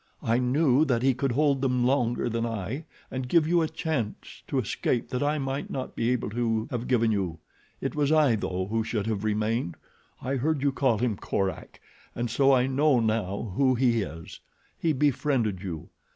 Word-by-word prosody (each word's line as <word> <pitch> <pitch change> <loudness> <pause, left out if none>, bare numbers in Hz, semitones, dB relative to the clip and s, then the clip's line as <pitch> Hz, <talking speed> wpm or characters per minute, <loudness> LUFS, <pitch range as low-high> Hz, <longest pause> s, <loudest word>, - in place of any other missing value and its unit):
"I 115 +2 +2
knew 135 +2 +3
that 125 -4 +1
he 135 0 +4
could 130 +1 -1
hold 140 0 +2
them 125 -2 +1
longer 125 -2 +1
than 115 0 -1
I 115 - -3 0.3
and 130 -1 -4
give 160 0 +4
you 170 +1 +3
a 160 - +1
chance 130 -10 -4
to - - -2
escape 120 - -1
that 125 - -2
I 145 +1 +1
might 135 0 -3
not 130 - -5
be 115 - 0
able 125 -4 -1
to 115 -1 0
have 120 -1 -3
given 115 -3 +3
you. 95 -6 -1 0.4
It - - -2
was 145 -1 +1
I 150 -7 +4
though 95 -3 -2
who 115 0 +1
should 110 -2 -2
have 110 -2 -2
remained. 110 -3 0 0.4
I 135 +1 -2
heard 145 +2 0
you 140 - +3
call 130 -4 +1
him 115 -2 0
Korak 95 -1 -3 0.4
and 120 -1 -2
so 135 +3 +4
I 125 -2 +4
know 135 0 +3
now 110 -2 -1
who 130 0 +3
he 120 -2 +2
is. 80 -4 -7 0.4
He 165 - 0
befriended 130 -8 +1
you. 85 -6 -6
125 Hz, 195 wpm, -27 LUFS, 110-135 Hz, 0.4 s, he